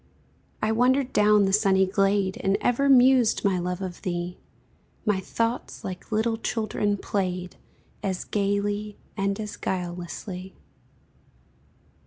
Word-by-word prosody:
I 215 - +2
wandered 255 +3 +2
down 210 -1 +5
the 195 - 0
sunny 195 -2 +4
glade 195 0 +1
And 195 0 +1
ever 275 +3 +2
mused, 255 -4 +5
my 190 -2 +2
love, 180 +2 -3
of 180 -2 -6
thee; 175 0 -3 0.7
My 210 -3 +2
thoughts, 230 +5 -3
like 185 +3 -7
little 225 +1 +1
children, 215 -2 -1
played, 185 -3 -3 0.5
As 190 -2 -2
gayly 205 +1 -1 0.2
and 195 +1 -1
as 210 -1 -5
guilelessly. 180 +1 -5
200 Hz, 120 wpm, -26 LUFS, 185-220 Hz, 0.7 s, down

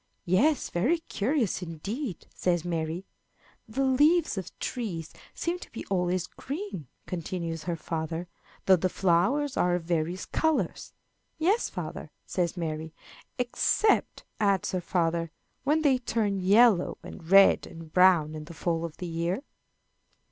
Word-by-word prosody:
"Yes, 240 - +2
very 240 - +2
curious 260 - -1
indeed," 185 - -5
says 175 -2 0
Mary. 165 +1 -2 0.6
"The 265 +5 -1
leaves 295 +5 +4
of 190 -3 -6
trees 185 -11 -4 0.2
seem 345 +1 -2
to - - -11
be 230 - -7
always 180 -1 +1
green," 280 - -6 0.2
continues 170 -2 -4
her 175 -1 -1
father, 165 +1 -4 0.4
"though 190 -1 +6
the 185 +2 0
flowers 195 +13 +1
are 175 0 +3
of 175 - -3
various 170 +2 -1
colors." 320 -1 -1 0.4
"Yes, 380 +9 +2
father," - - -6 0.2
says 175 -1 -1
Mary. 160 -1 -4 0.4
"Except," 250 - +1 0.2
adds 200 -3 +2
her 185 - -1
father, 170 -1 0 0.4
"when 310 +3 +2
they 270 -4 +4
turn 215 -5 0
yellow, 200 0 +4
and 165 -2 -10
red, 195 +1 +6
and 165 -2 -11
brown, 180 -4 +5
in 155 -1 -7
the 170 +1 -11
fall 165 -1 -1
of 165 -2 -8
the 180 - -5
year." 170 +8 -2
185 Hz, 140 wpm, -28 LUFS, 165-245 Hz, 0.6 s, though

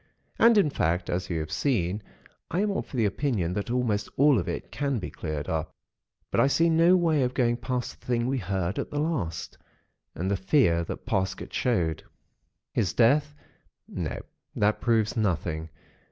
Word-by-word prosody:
And, 230 -1 +6
in 160 -8 +4
fact, 85 - 0
as 90 +1 -2
you 85 -2 -1
have 80 0 -6
seen, 105 - 0 0.5
I 180 - 0
am 210 0 +1
of 195 - -4
the 120 -5 +1
opinion 100 - 0
that 100 +4 -3
almost 115 -4 0
all 140 -3 +5
of 85 - -3
it - - -5
can 140 -2 -1
be 100 - -5
cleared 75 -3 -4
up; 80 0 -3 0.6
but - - +1
I - - +5
see 165 +4 +3
no 170 +3 +5
way 160 -4 +2
of 125 0 0
going 120 -2 +2
past 125 -1 -3
the - - -21
thing 120 -1 +1
we 130 +1 0
heard 95 -1 -2
at - - -3
the 145 - -5
last, 145 - -2 0.6
and 95 +3 -2
the - - +2
fear 95 - +3
that - - -7
Parsket 95 -6 -2
showed. 85 -10 0 0.7
"His 105 -5 0
death—— 145 +5 +3 0.5
No, - - -4 0.4
that 105 +1 +1
proves 115 -3 +2
nothing. 85 -6 -1
115 Hz, 180 wpm, -27 LUFS, 90-140 Hz, 0.7 s, And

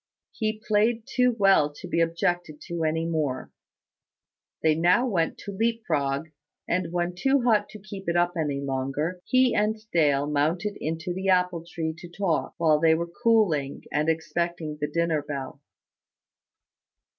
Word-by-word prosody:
He 215 -1 -2
played 220 +2 +2
too 250 -2 +2
well 195 -8 +4
to 180 - -9
be 170 -1 +1
objected 165 -1 -1
to 170 -1 -4
any 160 +1 0
more. 150 -6 -2 1.1
They 160 -1 +5
now 175 +10 +3
went 175 -9 0
to 200 - -7
leap 225 +3 -1
frog; 140 0 -1 0.4
and 180 -2 -1
when 175 0 -1
too 270 +8 +2
hot 215 -4 +3
to 215 - -10
keep 195 -3 -7
it 170 - 0
up 175 0 +2
any 150 -4 -1
longer, 140 +6 -2
he 255 -1 +3
and 210 +1 +1
Dale 145 -4 +3
mounted 160 +8 0
into 165 +3 -3
the 190 +2 -2
apple 180 -2 +2
tree 160 -2 -3
to 175 - -10
talk, 175 -2 -1
while 155 -2 +3
they 160 0 +5
were 170 +1 -3
cooling, 180 -12 +2
and 150 +2 +1
expecting 160 -1 -2
the 150 - +1
dinner 165 0 0
bell. 140 0 -6
170 Hz, 155 wpm, -26 LUFS, 155-195 Hz, 1.1 s, They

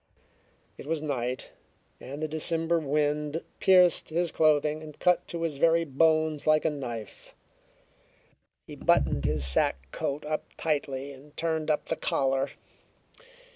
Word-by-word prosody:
It - - -9
was 160 -1 -2
night, 130 -3 -3 0.5
and 140 +4 -7
the - - 0
December 165 +2 +1
wind 150 +1 -1 0.2
pierced 180 -3 +5
his 170 +1 0
clothing 155 -1 +2
and 155 -2 -11
cut 180 -1 +2
to 170 -1 -4
his 155 -4 -2
very 165 +2 +3
bones 155 +1 +2
like 155 0 +4
a 160 - +3
knife. 120 -7 -7 1.3
He - - -10
buttoned 70 - +2
his 75 -2 0
sack 65 0 0
coat 145 +2 -3
up 155 0 -2
tightly 140 -3 -2
and 140 +2 -15
turned 160 -1 -1
up 150 - +1
the 165 - -2
collar. 135 -3 0
150 Hz, 135 wpm, -28 LUFS, 140-160 Hz, 1.3 s, pierced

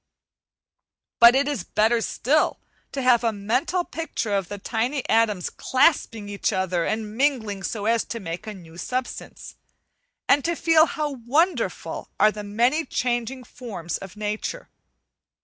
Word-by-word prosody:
But 235 +1 +9
it 275 +1 +2
is 280 -11 -2
better 225 +4 +2
still 290 +7 +1 0.3
to 270 - -3
have 245 -2 +4
a 230 - +2
mental 250 - 0
picture 295 -9 -3
of 195 -3 0
the 205 - -6
tiny 240 +6 -2
atoms 220 -5 +2
clasping 255 -6 +1
each 200 -1 -1
other, 185 -2 0
and 215 -1 -3
mingling 230 -7 0
so 205 +1 -3
as 230 +1 +2
to 230 - -5
make 170 0 -6
a 215 - -5
new 170 -3 -13
substance, 250 +6 -5 0.7
and 285 - +4
to 340 0 0
feel 325 0 +5
how 300 -1 -2 0.2
wonderful 265 - 0
are 215 +1 +6
the 210 0 -7
many 240 +10 +1
changing 245 -1 -2
forms 205 -9 -6
of 195 +1 -10
nature. 215 - -4
230 Hz, 150 wpm, -24 LUFS, 205-265 Hz, 0.7 s, But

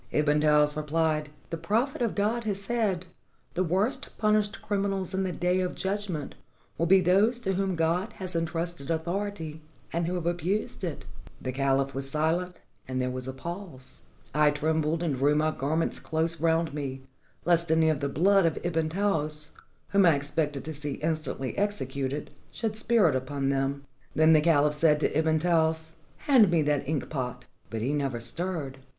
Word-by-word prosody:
Ibn 150 0 +2
Taous 150 -1 +4
repHed: 155 0 0 0.2
'The 165 - -2
Prophet 225 - 0
of 230 -3 0
God 220 +3 0
has 200 -2 -1
said, 200 -4 -1 0.5
"The 185 - +1
worst 190 +8 -1
punished 215 0 +1
criminals 195 -2 -1
in 190 - 0
the 190 -1 -1
Day 180 +1 +1
of 180 -1 -1
Judgment 190 -7 -3 0.5
will 170 - +2
be 190 +2 +6
those 200 +7 +4
to 195 -4 0
whom 190 -1 0
God 170 +7 0
has 185 -4 -6
en 165 0 +1
trusted 165 -2 -4
authority 165 -1 -3 0.3
and 170 0 0
who 180 - -1
have 175 -2 -3
abused 175 +5 -1
it." 170 -5 -4 0.2
' - - -21
The 130 - -3
caliph 135 +1 +1
507 - - -15
ARABIA - - -12
was 135 0 +3 0.4
silent, 180 - -23 0.3
and 130 0 -2
there 125 0 0
was 130 0 -5
a 130 - -4
pause. 170 -2 -8 0.3
I 150 +1 +5
trembled, 155 +2 0
and 160 -4 0
drew 145 +3 +3
my 155 +1 +2
garments 155 +3 -1
close 160 0 -1
round' 165 -1 +2
me, 135 -3 -5 0.4
lest 170 -1 +4
any 160 0 +4
of 155 -3 +1
the 140 -1 -1
blood 190 +4 +4
of 160 - -1
Ibn 160 -2 0
Taous, 155 -5 -1 0.4
whom 200 -2 +5
I 165 - +6
expected 145 0 -2
to 160 - -4
see 145 -1 -4
instantly 155 -4 -2
executed, 140 -8 -2 0.2
should 220 -2 -3
spirt 220 - +3
upon 135 +1 -1
them. 140 +1 -1 0.3
Then 160 +1 +6
the 155 - +6
cahph 150 -2 +3
said 150 0 +4
to - - 0
Ibn 160 0 +3
Taous: 160 -1 +1 0.3
'Hand 250 -9 +6
me 165 -3 +3
that 145 -1 0
ink 155 -3 -1
pot.' 130 -5 -4 0.2
But 110 -1 -3
he 135 +4 0
never 135 -5 -1
stirred. 140 +2 -3
160 Hz, 185 wpm, -28 LUFS, 145-185 Hz, 0.5 s, be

